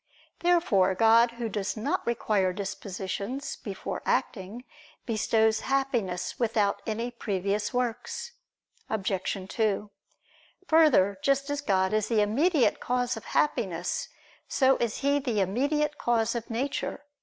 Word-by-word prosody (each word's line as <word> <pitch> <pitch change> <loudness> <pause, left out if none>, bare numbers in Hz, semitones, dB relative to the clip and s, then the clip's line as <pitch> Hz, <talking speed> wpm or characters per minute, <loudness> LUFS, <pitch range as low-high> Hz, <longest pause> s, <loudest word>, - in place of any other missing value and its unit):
Therefore 250 - +3
God 225 +3 +5
who 235 -1 -4
does 205 0 -3
not 285 +11 -2
require 210 -5 +1
dispositions 200 +6 -4
before 195 -3 -5
acting, 210 +4 -2 0.4
bestows 220 -1 +2
Happiness 235 -10 -1
without 215 -4 +1
any 230 +2 -2
previous 205 -2 -2
works. 250 - -3 0.6
Obj. 190 -2 -2
2: 210 -1 -1 0.8
Further, 240 -12 +4
just 275 +1 +1
as 290 0 -2
God 190 -6 +1
is 215 -1 +1
the 225 -1 +2
immediate 280 - +2
cause 245 0 0
of 220 - -9
Happiness, 190 - 0 0.4
so 265 -1 +3
is 235 -3 -2
He 280 +1 +2
the 245 -7 -1
immediate 285 +10 0
cause 230 -1 +1
of 235 -2 -5
nature. 270 +4 -3
225 Hz, 120 wpm, -28 LUFS, 200-265 Hz, 0.8 s, God